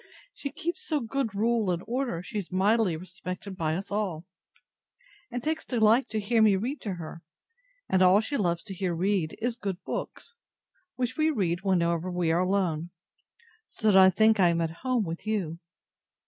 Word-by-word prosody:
She 280 - -5
keeps 340 +5 -4
so 305 -2 0
good 235 -3 -2
rule 225 -1 +1
and 175 -1 -1
order, 240 -7 -2
she 210 +3 -4
is 190 - -7
mightily 195 -1 +2
respected 185 +2 -7
by 160 -3 -1
us 195 +4 -5
all; 190 -6 -2 1.0
and 245 -1 -4
takes 315 +1 -1
delight 230 +1 +3
to 215 - -1
hear 220 +2 +2
me 215 -2 +6
read 245 +10 -3
to 200 -4 -3
her; 165 -1 -8 0.7
and 185 - +2
all 185 +2 +6
she 225 +7 -3
loves 170 -7 0
to 200 - -7
hear 185 -2 -2
read, 180 -2 0
is 235 +1 -1
good 195 -5 -4
books, - - -5 0.6
which 255 +2 -2
we 310 0 +3
read 185 - 0
whenever 170 -2 +1
we 175 -2 0
are 165 - +2
alone; 180 -4 0 0.8
so 215 -1 +1
that - - +3
I 190 0 +9
think 220 +3 +4
I 180 - +6
am 170 0 +1
at 165 -1 -1
home 255 -3 +1
with 165 +5 -6
you. 180 -7 -2
195 Hz, 185 wpm, -28 LUFS, 175-230 Hz, 1.0 s, I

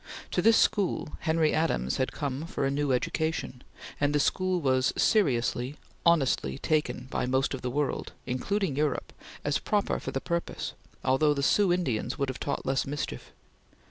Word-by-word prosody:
To - - +1
this 225 0 +6
school, 195 -6 +2
Henry 160 -1 +2
Adams 65 - +1
had 130 - 0
come 145 +2 -3
for 140 - -2
a 135 - +1
new 145 0 0
education, 130 0 -1 0.4
and 145 +1 +2
the - - +4
school 185 +5 +1
was 130 -3 +2
seriously, 130 - +2 0.3
honestly, 135 - +3
taken 150 -5 0
by - - -1
most 130 +2 +1
of 135 - -4
the 125 - -2
world, 145 +2 -2
including 150 +6 -1
Europe, 150 0 -1 0.3
as 145 0 +1
proper 205 -1 0
for - - -5
the 135 - -2
purpose, 170 +3 -3 0.3
although 145 +3 +3
the 140 - -1
Sioux 200 +4 +4
Indians 155 -12 0
would 140 -1 -1
have 130 - -5
taught 140 - -3
less 135 +1 0
mischief. 140 - -4
145 Hz, 170 wpm, -28 LUFS, 130-165 Hz, 0.4 s, this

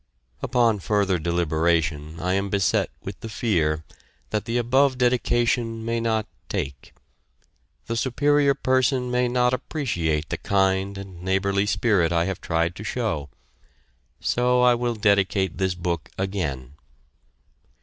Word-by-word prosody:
Upon 120 -4 +2
further 100 -2 +1
deliberation 80 -2 0
I 90 +2 0
am 100 +1 0
beset 100 -1 +1
with - - -7
the 115 - -7
fear 80 -9 0 0.5
that 105 -1 -1
the 115 +1 -1
above 130 +3 +3
dedication 120 -2 +1
may 115 0 0
not 110 -2 0 0.2
"take." 70 -2 -5 0.9
The 115 - -3
Superior 140 +4 +2
Person 130 -1 +1
may 125 0 +2
not 125 0 +2
appreciate 85 - -2
the 85 - -3
kind 95 +1 +1
and 95 -3 -9
neighborly 100 +2 +1
spirit 100 -7 +2
I 85 0 +2
have 95 -1 -4
tried 85 +1 0
to 105 - -7
show. 105 - -2 0.9
So 125 0 +2
I 125 0 +6
will 120 0 -1
dedicate 100 -2 +1
this 95 -1 0
book 85 -2 -3
again. 80 -10 -3
100 Hz, 130 wpm, -24 LUFS, 85-120 Hz, 0.9 s, I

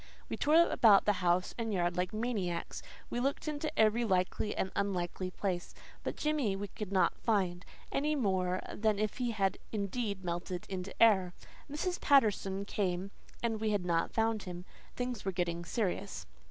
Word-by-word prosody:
We - - -2
tore 300 +2 +2 0.2
about 210 -4 +6
the 210 - +4
house 180 0 +2
and 225 -1 -1
yard 175 -3 +1
like 180 0 0
maniacs; 215 -7 -2 0.3
we 240 - -1
looked 275 +5 -1
into 300 0 -2
every 220 +2 +4
likely 190 0 0
and 190 - -1
unlikely 185 -2 -1
place. 185 -2 -3 0.3
But - - -3
Jimmy 295 -10 0
we 200 +1 -5
could 210 -3 -6
not 190 -2 +2
find, 185 -5 0 0.3
anymore 195 -11 +1
than 215 -1 +1
if 215 0 -1
he 245 -1 0
had 195 -4 0
indeed 200 -1 -2
melted 175 +1 -3
into 190 0 -5
air. 190 -6 +5 0.3
Mrs. 345 +5 -2
Patterson 200 -7 +3
came, 190 -1 -1 0.3
and 225 -2 0
we 220 - +1
had 205 -4 0
not 170 -1 +1
found 225 -1 +1
him. 180 -1 -7 0.3
Things 245 -3 -3
were 195 - -1
getting 170 -1 -2
serious. 195 +1 -2
200 Hz, 165 wpm, -33 LUFS, 180-225 Hz, 0.3 s, about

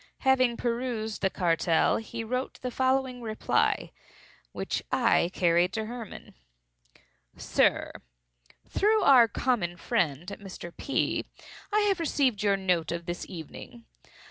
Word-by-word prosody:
Having 255 -3 +3
perused 235 -3 -2
the 190 - +2
cartel, 165 -3 +2
he 225 +1 -6
wrote 250 +3 -3
the 250 - -2
following 260 -1 0
reply, 220 -2 0 0.6
which - - -3
I 230 -8 +3
carried 175 +1 +2
to 220 -1 -2
Hermann. 235 -1 -8 1.0
"SIR,—Through - - -1
our 255 -4 +7
common 205 -6 -1
friend, 170 - -1 0.2
Mr. 180 -3 -9
P., 275 - -1 0.5
I 425 +1 +3
have 400 -3 +2
received 275 -9 +1
your 200 -1 +2
note 180 -4 0
of 170 0 -4
this 175 0 -5
evening. 190 +7 -10
220 Hz, 115 wpm, -28 LUFS, 175-255 Hz, 1.0 s, our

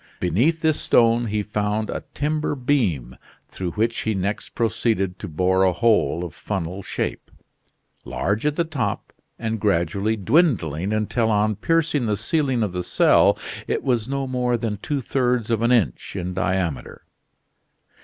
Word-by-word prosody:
Beneath 125 - +1
this 155 -2 +2
stone 115 0 +3
he 105 0 -1
found 105 +1 -1
a - - -4
timber 150 +1 -1
beam, 110 - 0 0.3
through 90 -2 -4
which 115 +4 0
he 110 -1 -1
next 100 +2 -3
proceeded 110 -5 0
to - - -6
bore 90 +4 +1
a 95 -1 +3
hole 95 -3 +2
of 85 -4 -6
funnel 95 -1 -4
shape, - - -4 0.7
large 105 +3 -2
at 150 - 0
the 170 - +2
top 155 -5 -3 0.2
and 110 -1 -3
gradually 100 +2 +1
dwindling 100 - +2
until 110 +2 0
on 105 0 +2
piercing 160 - +1
the 105 -1 0
ceiling 130 +1 0
of 100 -4 -2
the 90 - -2
cell - - +4 0.3
it - - -1
was 120 -4 0
no 135 0 -2
more 125 -2 0
than 110 -2 -3
two 140 +7 -3
thirds 125 -2 0
of 115 -1 +1
an 120 +1 +2
inch 100 - +1
in 90 -1 -3
diameter. 90 -8 -2
110 Hz, 155 wpm, -23 LUFS, 95-125 Hz, 0.7 s, cell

